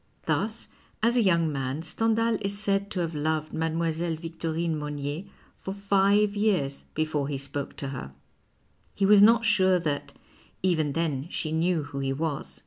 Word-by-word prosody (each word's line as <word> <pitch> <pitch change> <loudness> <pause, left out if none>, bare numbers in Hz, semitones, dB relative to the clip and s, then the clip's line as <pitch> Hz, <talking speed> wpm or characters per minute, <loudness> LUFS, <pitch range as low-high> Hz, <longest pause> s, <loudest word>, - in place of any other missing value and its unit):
Thus, 215 +3 -1 0.4
as 235 +1 +3
a 245 - +4
young 170 -6 +3
man 135 +2 -3
Stendhal 225 +5 +1
is 200 0 -2
said 200 -1 0
to 185 - -2
have 165 -1 -2
loved 155 +1 -1
Mile. 160 0 -1 0.2
Vietorine 165 0 -2
Monnier 150 +3 -4 0.3
for 190 - -5
five 200 +1 +3
years 185 -10 0
before 155 -2 0
he 140 -1 -2
spoke 140 +1 -4
to 140 - -5
her. 125 - -6 0.8
He 195 - +2
was 205 0 +7
not 230 +2 +6
sure 190 -4 +4
that 150 -5 -3 0.5
even 160 -6 +1
then 155 -3 -1
she 155 - -3
knew 165 0 +1
who 145 -1 -6
he 135 0 -1
was. 150 0 -3
165 Hz, 160 wpm, -27 LUFS, 150-200 Hz, 0.8 s, was